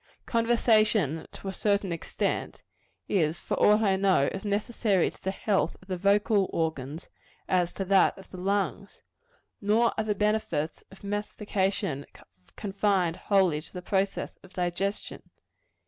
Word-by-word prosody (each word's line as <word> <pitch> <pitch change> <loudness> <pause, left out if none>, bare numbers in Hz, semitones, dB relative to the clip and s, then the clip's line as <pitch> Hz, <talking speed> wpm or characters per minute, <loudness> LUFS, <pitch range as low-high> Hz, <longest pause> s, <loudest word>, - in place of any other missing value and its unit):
Conversation, 215 - +2
to - - -10
a 195 - -3
certain 200 -2 0
extent, 170 - -3 0.4
is, 165 -3 +1
for - - -4
aught 210 +1 +5
I 195 -2 +3
know, 190 -7 +3
as 195 - -6
necessary 205 -2 +1
to - - -21
the 190 - -1
health 195 -4 0
of 185 - -20
the 185 - -2
vocal 200 +1 +2
organs, 160 -2 -3 0.4
as 180 -2 +2
to 195 - -3
that 195 +1 +4
of 195 - -13
the 185 - -8
lungs. 195 +2 -2 0.6
Nor 220 +3 +3
are - - +2
the 210 -1 -1
benefits 200 -7 -1
of 195 - -16
mastication 200 -6 -2 0.5
confined 195 -4 0
wholly 185 -7 +2
to - - -12
the 180 -1 -7
process 195 +1 -1
of 190 0 -17
digestion. 180 +2 -2
195 Hz, 145 wpm, -28 LUFS, 180-205 Hz, 0.6 s, aught